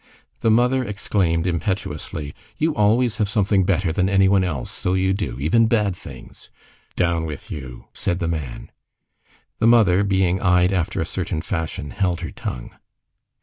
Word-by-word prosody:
The 115 - +1
mother 125 +3 +3
exclaimed 95 -6 0
impetuously:— 85 -4 -3 0.2
"You 160 +1 +1
always 110 +2 +2
have 105 -4 0
something 100 -3 +2
better 90 -3 +1
than 95 +2 +1
any 95 -1 +4
one 95 -1 +3
else, 75 -9 -3
so 90 - -1
you 95 0 +2
do! 75 - -3
even 110 +11 +3
bad 105 -5 +1
things." - - -13 0.5
"Down 85 -2 +1
with 75 -3 -7
you!" 60 -4 -8
said 85 - -1
the 85 -2 -2
man. 75 -7 -5 0.9
The 115 - +3
mother, 105 -5 +5
being 95 -2 +1
eyed 90 0 +3
after 85 -4 -1
a - - -1
certain 80 - -3
fashion, 80 -7 -4
held 90 -3 -1
her 85 - -5
tongue. - - -6
95 Hz, 160 wpm, -22 LUFS, 85-105 Hz, 0.9 s, mother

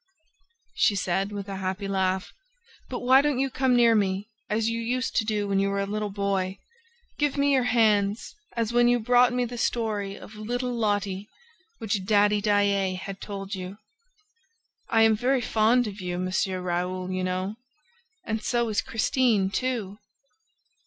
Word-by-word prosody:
she 210 - +3
said, 195 +1 -1
with 200 -1 -6
a 195 -1 -5
happy 190 +1 -3
laugh. 190 -1 -1 0.6
"But 250 - -4
why 260 +2 +6
don't 290 -2 0
you 270 0 0
come 260 -1 +2
near 235 -1 +5
me, 200 -1 0 0.2
as 215 +1 0
you 230 0 -1
used 250 +2 -2
to 220 - +2
do 210 -2 -1
when 195 -1 +1
you 195 0 +1
were 200 0 -1
a 200 - 0
little 210 +1 -3
boy? 195 -1 -1 0.6
Give 290 -1 +1
me 280 0 +3
your 260 -2 +3
hands, 215 -3 +2 0.2
as 230 0 -1
when 240 0 +5
you 245 0 +3
brought 245 +2 +4
me 250 0 0
the 240 0 -6
story 210 -5 -1
of 210 - -12
little 245 +4 -3
Lotte, 205 -3 -1 0.5
which 205 -3 -2
Daddy 205 +1 +3
Daae 200 -2 +2
had 195 +1 -7
told 195 -1 -6
you. 190 +1 -6 1.1
I 225 -1 +4
am 220 -1 +5
very 255 +4 +1
fond 230 +1 +2
of 205 -2 -6
you, 180 -1 -3
M. 185 +1 -3 0.3
Raoul, 180 +1 -2
you 185 0 -2
know. 185 +3 -2 0.7
And 220 0 -2
so 235 -1 0
is 210 - +1
Christine 225 -4 +1
too!" 220 -5 -2
210 Hz, 170 wpm, -26 LUFS, 195-235 Hz, 1.1 s, why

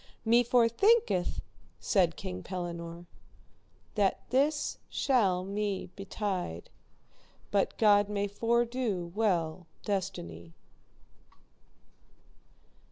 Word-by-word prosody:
Me 235 +2 +5
forthinketh, 245 - +3 0.4
said 170 - +2
King 90 0 -6
Pellinore, 170 - -6 0.9
that 200 -3 0
this 285 +3 +1
shall 195 -9 +2
me 200 -2 -3
betide, 195 - -4 0.8
but 200 -1 +1
God 205 -2 +5
may 205 -1 -1
fordo 230 -3 0
well 180 -5 0 0.2
destiny. 85 - -4
200 Hz, 75 wpm, -30 LUFS, 175-230 Hz, 0.9 s, Me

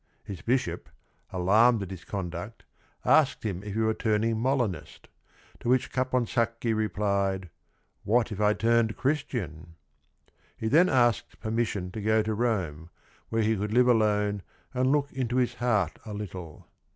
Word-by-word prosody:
His 100 -5 -8
bishop, 90 - -1 0.4
alarmed 105 +5 +4
at 95 - -8
his 90 -2 -9
conduct, 95 +3 -5 0.4
asked - - +4
him 95 -4 -3
if 105 0 -6
he - - 0
were 110 0 +2
turning 110 0 +1
Molinist, 115 - -2 0.5
to - - -3
which 130 0 +2
Caponsacchi 120 -2 0
replied, 100 -4 -1 0.5
"what 120 +2 +2
if 105 0 -4
I 105 0 +3
turned 115 -1 +2
Christian?" 95 - -3 0.8
He 110 - -3
then 170 +7 +5
asked 120 -3 +1
permission 110 -5 -2
to 110 - -6
go 110 +1 +2
to 110 0 -1
Rome, 95 -9 -1 0.4
where 115 0 +1
he 110 +1 +2
could 105 +1 -3
live 125 +1 +5
alone 105 -3 +2 0.3
and 130 +1 +2
look 145 -1 +1
into 125 -2 -2
his 125 -1 +2
heart 105 -9 0
a 105 -2 -7
little. 90 -6 -8
110 Hz, 150 wpm, -28 LUFS, 95-120 Hz, 0.8 s, then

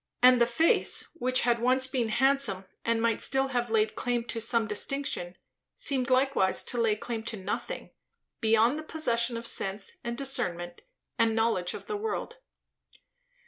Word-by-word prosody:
And 250 -1 +7
the 235 - +5
face, 320 +8 +2
which 255 -5 +1
had 235 -1 +1
once 255 +2 +4
been 255 -4 -1
handsome, 255 -6 +2 0.2
and 230 0 0
might 230 -2 +1
still 270 0 +2
have 245 -2 -1
laid 220 -1 +1
claim 245 -1 -2
to 230 - -2
some 230 0 +1
distinction, 210 -4 -3 0.4
seemed 270 - +1
likewise 255 -7 +2
to 240 -2 -2
lay 220 -2 +2
claim 225 +1 -5
to 230 -2 -2
nothing, 190 +1 -5 0.5
beyond 225 +5 +3
the - - -7
possession 235 -7 -1
of 230 - -7
sense 195 -2 -3
and 235 0 -4
discernment 175 -11 -2 0.4
and 225 -1 +3
knowledge 225 -6 0
of - - -9
the 425 - -3
world. 445 +3 -4
235 Hz, 160 wpm, -28 LUFS, 220-265 Hz, 0.5 s, And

